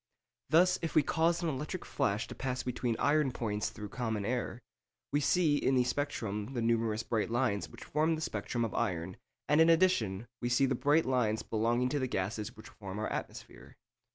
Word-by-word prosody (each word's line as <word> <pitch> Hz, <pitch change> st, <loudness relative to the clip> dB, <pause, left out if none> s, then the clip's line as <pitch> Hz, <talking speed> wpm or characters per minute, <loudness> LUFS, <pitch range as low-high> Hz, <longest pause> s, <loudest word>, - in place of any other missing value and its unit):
Thus, 180 Hz, +3 st, +5 dB
if 165 Hz, -, -3 dB
we 155 Hz, -, +6 dB
cause 165 Hz, +4 st, +1 dB
an 165 Hz, -, +1 dB
electric 150 Hz, +6 st, -4 dB
flash 100 Hz, +3 st, -1 dB
to -, -, -7 dB
pass 130 Hz, -1 st, -3 dB
between 125 Hz, -2 st, -1 dB
iron 145 Hz, -2 st, +2 dB
points 105 Hz, -4 st, -2 dB
through 105 Hz, -1 st, -8 dB
common 110 Hz, -4 st, -2 dB
air, 120 Hz, 0 st, -2 dB, 0.5 s
we 145 Hz, -, +2 dB
see 150 Hz, +1 st, +3 dB
in 135 Hz, -2 st, +2 dB
the 125 Hz, -, +4 dB
spectrum 115 Hz, -5 st, -3 dB
the 120 Hz, -, 0 dB
numerous 115 Hz, -1 st, +1 dB
bright 110 Hz, -2 st, -1 dB
lines 120 Hz, -4 st, 0 dB
which -, -, -11 dB
form 155 Hz, +2 st, +1 dB
the 155 Hz, -, -6 dB
spectrum 115 Hz, -2 st, -2 dB
of 110 Hz, -, -5 dB
iron, 90 Hz, 0 st, -2 dB, 0.3 s
and 150 Hz, +3 st, +5 dB
in 160 Hz, -, +6 dB
addition 120 Hz, -, +3 dB, 0.2 s
we 120 Hz, -, -1 dB
see 120 Hz, +3 st, +4 dB
the 130 Hz, -, +1 dB
bright 145 Hz, +5 st, +3 dB
lines 120 Hz, -4 st, +1 dB
belonging 120 Hz, +3 st, +1 dB
to 145 Hz, +2 st, 0 dB
the 130 Hz, -, 0 dB
gases 105 Hz, 0 st, -3 dB
which 110 Hz, -, -11 dB
form 100 Hz, -2 st, -8 dB
our 110 Hz, -, -2 dB
atmosphere. -, -, -7 dB
125 Hz, 195 wpm, -32 LUFS, 110-145 Hz, 0.5 s, we